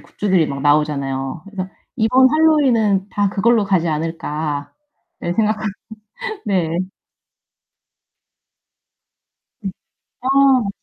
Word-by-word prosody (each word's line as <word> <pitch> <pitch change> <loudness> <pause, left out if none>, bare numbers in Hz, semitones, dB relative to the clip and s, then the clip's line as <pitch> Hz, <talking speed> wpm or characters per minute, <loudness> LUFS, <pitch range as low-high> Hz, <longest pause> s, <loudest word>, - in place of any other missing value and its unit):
굿즈들이 185 -6 0
막 140 0 -5
나오잖아요. 145 -1 0
그래서 195 -2 -6 0.3
이번 255 +3 +4
핼러윈은 250 -11 +3
다 205 -1 +1
그걸로 215 +2 +2
가지 185 -4 +1
않을까 155 -2 -3 0.5
예 175 - -1
생각합니다. 215 0 0 0.7
네. 185 -5 +1 2.9
네. 195 -3 -4 0.5
아 255 - -4
맞아요. 270 -6 +4
195 Hz, 220 characters per minute, -19 LUFS, 155-225 Hz, 2.9 s, 이번